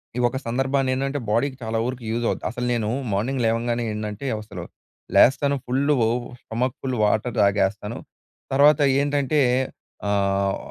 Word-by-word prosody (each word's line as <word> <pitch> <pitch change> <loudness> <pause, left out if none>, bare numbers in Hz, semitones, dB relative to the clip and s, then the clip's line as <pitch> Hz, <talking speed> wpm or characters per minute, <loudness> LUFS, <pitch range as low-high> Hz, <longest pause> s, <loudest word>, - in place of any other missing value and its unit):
ఈ - - -2
ఒక 125 +2 -3
సందర్భాన్ని 135 +2 +1
ఏంటంటే, 135 +2 -1
బాడీకి 130 +5 0
చాలా 110 0 -2
వరకు 125 -1 -4
యూజ్ 120 +1 -1
అవుద్ది. - - -3
అసలు 125 +2 -4
నేను 110 -2 -1 0.2
మార్నింగ్ 125 +6 -1
లేవంగానే 115 +1 0
ఏంటంటే, 105 +3 -5 0.2
అసలు 110 - -8 0.5
లేస్తాను. 140 +2 +5
Full 140 +4 +1 0.5
stomach 125 +3 -2
full 130 -2 -2
water 110 +3 +1
తాగేస్తాను. 100 +2 +1 0.6
తర్వాత 145 +2 +6 0.2
ఏంటంటే 145 +1 +1 0.7
ఆహ్, 100 -1 +1
120 Hz, 135 wpm, -23 LUFS, 105-135 Hz, 0.7 s, తర్వాత